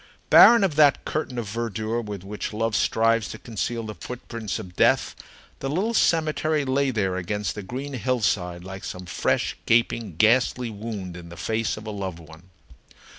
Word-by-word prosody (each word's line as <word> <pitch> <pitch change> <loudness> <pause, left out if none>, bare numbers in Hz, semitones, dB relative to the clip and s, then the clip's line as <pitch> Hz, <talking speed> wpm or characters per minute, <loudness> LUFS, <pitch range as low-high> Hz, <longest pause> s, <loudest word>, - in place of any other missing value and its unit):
Barren 235 -2 +9
of 165 -6 0
that 145 -3 +5
curtain 145 -5 -3
of 115 -3 -3
verdure 115 +1 -2
with 105 -4 -7
which 105 +2 -5
love 115 0 -1
strives 115 0 +2
to - - -7
conceal 115 +1 -3
the 110 -1 -6
footprints 115 -3 -6
of 95 -5 -9
death, - - +3 0.4
the 135 - -3
little 195 +10 0
cemetery 155 -5 +2
lay 135 +1 +1
there 95 -6 -1
against 100 +2 -2
the 105 - -6
green 130 +8 -6
hillside 105 -9 -1
like 95 +1 -8
some 90 0 -6
fresh, 80 - 0
gaping, 115 -5 +1
ghastly 120 +4 +3
wound 100 -4 -6
in 85 -1 -10
the 85 - -11
face 110 +1 -1
of 110 - -9
a 110 - -4
loved 95 -4 -4
one. 80 +2 -15
110 Hz, 175 wpm, -24 LUFS, 95-125 Hz, 0.4 s, Barren